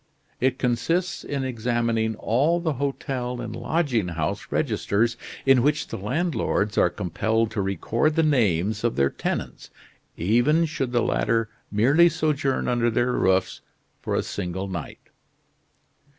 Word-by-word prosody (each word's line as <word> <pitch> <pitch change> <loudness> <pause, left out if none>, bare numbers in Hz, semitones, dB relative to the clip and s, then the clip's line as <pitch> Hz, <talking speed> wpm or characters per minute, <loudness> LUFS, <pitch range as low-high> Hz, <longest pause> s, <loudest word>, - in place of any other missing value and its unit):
It 130 0 +1
consists 165 +8 0
in 140 -2 -3
examining 115 -2 0
all 140 +11 +1
the 165 -3 -1
hotel 130 -3 -3
and 115 -2 -5
lodging 135 - 0
house 80 -3 -3
registers, 115 +3 0 0.3
in 135 -2 +5
which 145 +3 +1
the - - -4
landlords 120 - -1
are - - +4
compelled 110 +6 -1
to 110 -2 -1
record 110 - 0
the 165 - +3
names 110 - +1
of 120 - +1
their 70 0 +2
tenants, - - -4 0.5
even 120 - +3
should 140 -5 -3
the 120 -1 +2
latter 115 -2 +1 0.2
merely 140 +11 +5
sojourn 140 -5 0
under 120 -1 +2
their 120 +2 +1
roofs 95 -5 +1 0.4
for - - -2
a - - +1
single 95 0 -4
night. 85 -5 -7
120 Hz, 135 wpm, -24 LUFS, 105-140 Hz, 0.5 s, in